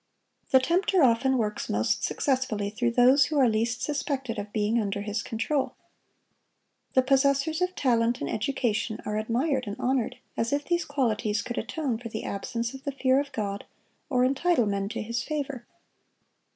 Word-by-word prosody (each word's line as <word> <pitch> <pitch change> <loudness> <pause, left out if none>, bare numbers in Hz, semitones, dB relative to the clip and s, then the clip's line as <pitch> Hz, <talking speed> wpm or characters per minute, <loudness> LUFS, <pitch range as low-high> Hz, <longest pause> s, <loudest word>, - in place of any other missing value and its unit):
The 260 - +6
tempter 350 +5 +2
often 260 +2 +3
works 210 -3 -2
most 105 +2 0
successfully 240 -7 0
through 240 +2 0
those 255 +4 +6
who 305 - -2
are 265 -3 +5
least 230 +2 0
suspected 270 -6 -2
of 205 0 -6
being 215 +2 +1
under 200 -1 -2
his 210 +1 -2
control. 260 +5 -1 1.2
The 260 - +5
possessors 275 +4 +2
of 365 0 0
talent 235 -2 +2
and 140 - -3
education 220 - -1
are 210 0 -1
admired 255 +3 0
and 205 - -3
honored, 255 -2 0 0.2
as 230 +1 -1
if 285 0 0
these 345 -2 0
qualities 225 -7 0
could 245 -1 -3
atone 275 -8 -2
for 235 -1 -7
the 220 - -5
absence 230 +4 -3
of 270 0 -10
the 285 - -2
fear 265 -1 +2
of 285 0 -3
God, 200 -4 -3 0.5
or 250 -3 +3
entitle 275 0 +2
men 200 -1 -1
to 225 - -4
His 235 +2 -2
favor. 280 -3 -4
245 Hz, 170 wpm, -27 LUFS, 220-275 Hz, 1.2 s, The